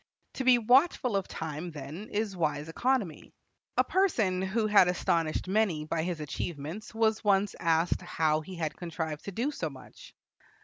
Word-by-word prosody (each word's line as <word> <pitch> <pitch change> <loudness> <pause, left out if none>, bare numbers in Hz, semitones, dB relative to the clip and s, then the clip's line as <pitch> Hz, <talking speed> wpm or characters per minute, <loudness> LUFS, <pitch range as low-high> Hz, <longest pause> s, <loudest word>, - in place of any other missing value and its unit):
To 265 - -3
be 255 -1 +6
watchful 250 0 +3
of 195 -1 0
time, 160 +2 -5
then, 155 +6 -8
is 210 -2 -2
wise 150 -2 -1
economy. 225 - -1 0.4
A - - +6
person 225 - +1
who 205 +4 0
had 205 -4 +6
astonished 170 -2 0
many 190 -6 +1
by 160 +1 -1
his 170 0 -3
achievements 155 - -5
was 220 0 +2
once 200 -1 +3
asked 165 +2 +2
how 155 -3 +1
he 185 +4 -9
had 160 -3 -3
contrived 160 -3 -5
to 200 - -4
do 240 +9 -1
so 170 - -3
much. 135 -2 -14
180 Hz, 165 wpm, -29 LUFS, 160-215 Hz, 0.4 s, be